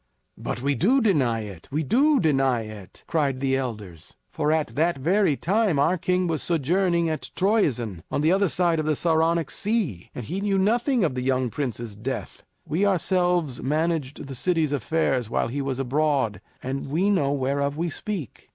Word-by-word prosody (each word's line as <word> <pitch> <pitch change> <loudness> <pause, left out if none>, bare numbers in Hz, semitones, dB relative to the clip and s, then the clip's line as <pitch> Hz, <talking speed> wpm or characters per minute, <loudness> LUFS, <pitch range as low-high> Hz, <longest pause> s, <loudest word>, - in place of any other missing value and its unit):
"But 120 - -4
we 140 +1 +2
do 220 - +3
deny 140 - +2
it 100 -6 -9
we 155 +3 0
do 275 - +3
deny 135 - +2
it!" 105 -3 -11
cried 140 -5 0
the 135 0 +1
elders. 105 -11 -6 0.2
"For 150 -1 0
at 155 -1 0
that 165 +2 +1
very 170 +3 +2
time 200 -2 +1
our 160 +6 +3
king 180 +2 +1
was 160 -4 -1
sojourning 170 +2 +1
at 155 -1 -3
Troezen 130 - +1
on - - -1
the 155 +2 +3
other 195 +1 +3
side 170 -2 +1
of 155 - -2
the 155 - +2
Saronic 165 0 +1
Sea, 200 - -2
and 120 - -5
he 185 - -3
knew 200 -1 +1
nothing 235 +5 +2
of 160 - +1
the 125 - -3
young 130 -1 0
prince's 120 -6 -4
death. 125 +5 -5 0.2
We 165 +7 -1
ourselves 180 -7 +1
managed 150 -1 -1
the 135 - -7
city's 160 +2 +1
affairs 135 -3 0
while 115 - 0
he 140 +4 -3
was 135 -2 -2
abroad, 135 -6 0 0.2
and 135 +2 -3
we 175 +9 +1
know 145 -9 +2
whereof 140 +1 -1
we 170 0 -1
speak. 190 - -6
150 Hz, 180 wpm, -25 LUFS, 130-180 Hz, 0.2 s, do